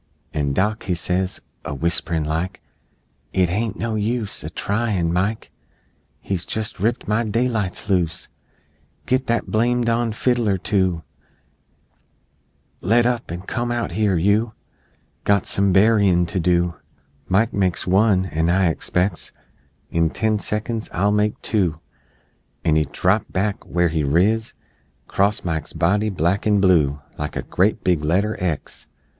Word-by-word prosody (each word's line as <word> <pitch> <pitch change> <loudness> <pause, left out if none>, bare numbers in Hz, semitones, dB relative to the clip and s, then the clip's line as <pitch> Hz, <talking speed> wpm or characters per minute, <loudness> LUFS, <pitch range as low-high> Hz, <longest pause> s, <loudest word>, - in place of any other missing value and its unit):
An' 70 -2 0
Dock 105 +7 0
he 90 - 0
says, 90 +2 -2 0.2
A 75 - -4
whisperin' 80 +1 +1
like, 80 +5 -2 0.7
"It 90 -2 +2
hain't 110 +5 -1
no 115 -1 -2
use 110 0 -2
A 75 - -4
tryin'! 100 -2 -1
Mike 100 +5 -1 0.7
He's 95 -3 -3
jes' 110 -2 -4
ripped 115 +5 0
my 110 +3 +1
daylights 110 -3 -1
loose! 90 -5 0 0.8
Git 130 +1 0
that 115 0 0
blame 120 +2 +2
don 115 0 +1
fiddler 115 -3 +1
to 95 -4 0 1.8
Let 115 +5 +3
up, 120 -1 -1
an' 85 +1 -5
come 120 +5 -3
out 120 -6 -2
here 100 0 +1
You 105 +6 +2 0.7
Got 100 -2 +2
some 100 0 +2
burryin' 95 -3 +4
to 95 - -1
do, 85 0 +2 0.5
Mike 105 +7 +2
makes 95 -3 0
one, 95 0 +3
an' 80 -2 0
I 90 0 +3
expects 90 +2 -1 0.6
In 85 -1 +2
ten 110 +4 0
seconds 110 +2 -3
I'll 100 +4 +1
make 105 0 +1
two!" 90 -7 0 0.9
And 80 -2 +3
he 80 -1 +3
drapped 95 +9 0
back, 100 +1 -1
where 90 -1 +1
he 80 -1 -1
riz, 100 +10 +1 0.5
'Crost 100 +1 +1
Mike's 80 -3 -3
body, 100 +5 +1
black 95 +2 0
and 105 -1 +4
blue, 75 -7 +3 0.2
Like 75 0 -4
a - - -2
great 105 +3 +1
big 85 -5 +1
letter 95 +8 +1
X! 85 -5 -3
95 Hz, 140 wpm, -21 LUFS, 85-110 Hz, 1.8 s, burryin